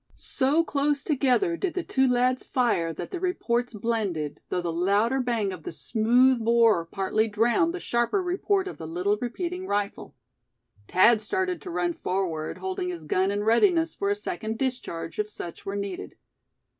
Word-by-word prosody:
So 285 +5 +1
close 290 -2 0
together 300 +5 +2
did 355 0 -3
the 365 - -1
two 265 -4 +2
lads 250 +1 +2
fire 235 - +1
that 165 - -7
the 365 - -4
reports 245 - -1
blended, 200 -9 -2
though 180 - 0
the 170 -1 -3
louder 205 +9 +2
bang 230 -6 -1
of 180 - -9
the - - -6
smooth 235 +7 +3
bore 225 -7 +4
partly 195 +5 0
drowned 235 - +2
the 360 - -5
sharper 240 +9 0
report 380 +2 0
of - - -7
the 160 - -6
little 185 +6 0
repeating 355 +9 -4
rifle. 205 0 -3 0.7
Thad 215 +4 +5
started 370 - -2
to 375 - -8
run 345 0 -1
forward, 180 - -2
holding 185 -1 -3
his 170 -3 -6
gun 185 +5 +1
in 205 +1 -1
readiness 325 - +3
for 400 - -2
a 405 - +2
second 295 - -4
discharge, 220 -12 -3
if 210 0 -1
such 175 -4 -8
were 195 - -2
needed. 200 -2 -5
235 Hz, 170 wpm, -26 LUFS, 195-320 Hz, 0.7 s, Thad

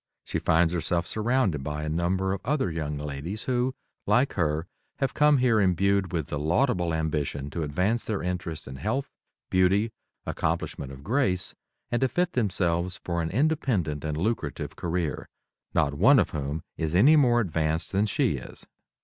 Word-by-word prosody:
She - - -3
finds 80 +1 +3
herself 85 0 0
surrounded 110 - +1
by 75 +1 -3
a - - -3
number 90 +4 0
of 95 - -4
other 135 - 0
young 75 -2 -3
ladies 75 +8 -4
who, 130 +1 0 0.3
like 130 +3 +3
her, 80 -2 0 0.3
have 135 -2 -1
come 150 -1 +5
here 125 -4 +3
imbued 100 +1 +2
with 80 -5 -1
the 75 - -4
laudable 90 - +1
ambition 75 -3 -2
to 85 - -3
advance 90 +10 0
their 110 -3 -3
interests 85 -3 -3
in 65 0 -8
health, 130 - -2 0.4
beauty, 95 +4 +3 0.3
accomplishment 70 -1 -2
of 70 0 -11
grace, 100 - 0 0.4
and 120 - 0
to 130 - +4
fit 175 +6 0
themselves 90 -5 0
for 85 -1 -1
an 80 - -2
independent 115 - 0
and 75 -1 -2
lucrative 110 +8 -2
career, 85 -2 -2 0.5
not 70 - +2
one 70 - +6
of - - +2
whom 75 +2 -3
is 80 +1 -1
any 135 - +7
more 125 -5 +5
advanced 80 -5 -1
than 100 +2 +2
she - - +1
is. - - -10
90 Hz, 165 wpm, -27 LUFS, 80-115 Hz, 0.5 s, any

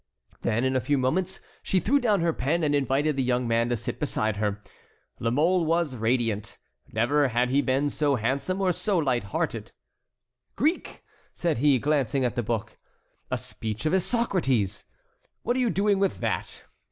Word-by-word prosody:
Then, 115 +3 0
in 130 0 +1
a 130 - +2
few 145 +2 +1
moments, 175 +9 -1 0.2
she 190 - +1
threw 275 +10 +2
down 215 -7 +2
her 165 -1 +1
pen 160 +5 0
and 145 -1 +2
invited 145 +2 +1
the 135 - 0
young 125 -1 0
man 115 +1 +1
to 120 - 0
sit - - -5
beside 110 -1 -1
her. 105 -1 -1 0.6
La 115 - 0
Mole 165 +8 +2
was 165 -4 0
radiant. 115 -2 -1 0.3
Never 140 +6 +2
had 125 +1 0
he 140 +2 +3
been 140 +2 +1
so 145 -2 +1
handsome 135 - -1
or 185 -2 +2
so 200 +3 -1
light 130 -9 +1
hearted. 95 - -3 0.8
"Greek!" 315 +7 -1 0.3
said 170 -8 -1
he, 140 0 +4
glancing 140 -1 +1
at 120 - 0
the 120 - 0
book. 110 -2 -3 0.5
"A - - 0
speech 110 +3 -6
of 155 - +1
Isocrates! 175 - 0 0.6
What 245 - 0
are - - 0
you 245 -2 +2
doing 200 -1 +2
with 195 -1 0
that? - - -3
140 Hz, 175 wpm, -26 LUFS, 120-175 Hz, 0.8 s, he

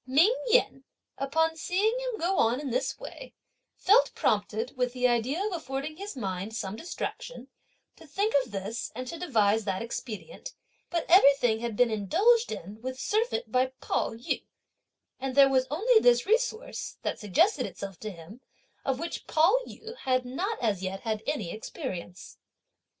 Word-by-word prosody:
Ming 325 - +5
Yen, 460 - +3 0.4
upon 320 +4 +1
seeing 385 +7 +1
him - - -3
go 360 +3 +1
on 235 +3 +3
in 285 -3 -4
this - - -1
way, - - -10 0.4
felt 435 +6 +4
prompted, 215 +3 0
with 250 -1 0
the 250 0 +2
idea 250 - 0
of 425 - -2
affording 300 -1 -4
his 400 -5 -7
mind 195 0 -4
some 200 -3 -3
distraction, 350 - -6 0.5
to 325 - -15
think 400 +9 0
of 250 - -13
this 205 +4 -4
and 255 +1 -5
to 330 +6 -6
devise 220 - +2
that 195 +1 -1
expedient; 240 - -7 0.3
but 340 -2 -1
everything 275 - +6
had 235 -2 -3
been 245 -2 +4
indulged 405 - +3
in 205 +6 -7
with 255 +1 -5
surfeit 455 - 0
by 255 0 +3
Pao - - -1
yü, 230 - -3 0.8
and 265 -1 -3
there 275 -1 +7
was 260 -1 +2
only 440 - +4
this 245 - +4
resource, 450 +2 -1
(that - - -2
suggested 330 - +2
itself 195 -2 -8
to 215 - -5
him,) 190 +6 -12 0.4
of 270 -2 0
which 335 +4 -5
Pao 330 +8 +4
yü 455 +1 -9
had 255 - 0
not 370 - -2
as 205 -5 +1
yet 195 +1 -4
had 220 -2 -2
any 225 - -2
experience. 195 - -7
260 Hz, 165 wpm, -28 LUFS, 220-360 Hz, 0.8 s, there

